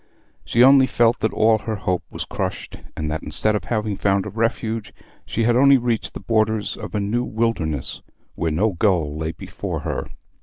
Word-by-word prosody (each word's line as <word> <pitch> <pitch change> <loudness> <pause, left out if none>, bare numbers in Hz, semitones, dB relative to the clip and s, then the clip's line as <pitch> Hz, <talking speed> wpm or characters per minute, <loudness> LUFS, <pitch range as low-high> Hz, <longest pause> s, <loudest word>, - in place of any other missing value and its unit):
She 120 - +3
only 135 0 +7
felt 120 -1 +2
that 110 +1 0
all 110 0 +3
her 110 0 -3
hope 90 -3 -1
was - - -5
crushed, - - -4 0.2
and 75 -1 -2
that 80 - -2
instead 110 0 -1
of 105 - -3
having 105 -3 -1
found 100 -1 +1
a 105 - -5
refuge 115 0 -2 0.3
she 115 - -1
had 120 +1 +3
only 140 +2 +6
reached 120 -2 -2
the - - -5
borders 110 -1 0
of - - -7
a - - +1
new 105 +5 0
wilderness 105 - -2 0.3
where 80 - -1
no 95 +8 +1
goal 85 -5 +1
lay 80 +1 -2
before - - -6
her. - - -3
110 Hz, 190 wpm, -22 LUFS, 95-115 Hz, 0.3 s, only